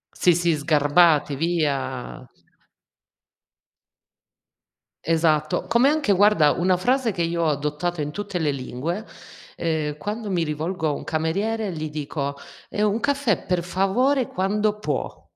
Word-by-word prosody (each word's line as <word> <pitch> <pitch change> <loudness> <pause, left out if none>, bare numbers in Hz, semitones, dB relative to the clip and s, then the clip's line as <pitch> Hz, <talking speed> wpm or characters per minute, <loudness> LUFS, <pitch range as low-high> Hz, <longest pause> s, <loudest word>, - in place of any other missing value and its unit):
Sì, 175 - +4
sì, 170 -1 +2
sgarbati 150 0 +3
via. 140 -6 -2 2.8
Esatto. 155 -2 +1
Come 235 +4 +4
anche 295 -8 +2
guarda, 195 -6 +5
una 180 +1 +1
frase 245 +4 +1
che 175 -2 -2
io 170 0 -1
ho - - +2
adottato 150 +4 -2
in 150 0 -2
tutte 200 0 -4
le 155 -3 +1
lingue, 140 - -4 0.5
ehm, 155 -3 -1
quando 210 +6 -4
mi 175 -3 +1
rivolgo 160 +2 -2
a - - +1
un - - -6
cameriere 195 +6 -1
gli 155 -1 -4
dico: 145 -1 -4 0.3
"Ehm, 210 0 +1
un 215 +3 -2
caffè 280 -5 0
per 180 -2 0
favore 230 +9 +1
quando 210 +3 0
può." - - -3
170 Hz, 135 wpm, -23 LUFS, 150-205 Hz, 2.8 s, guarda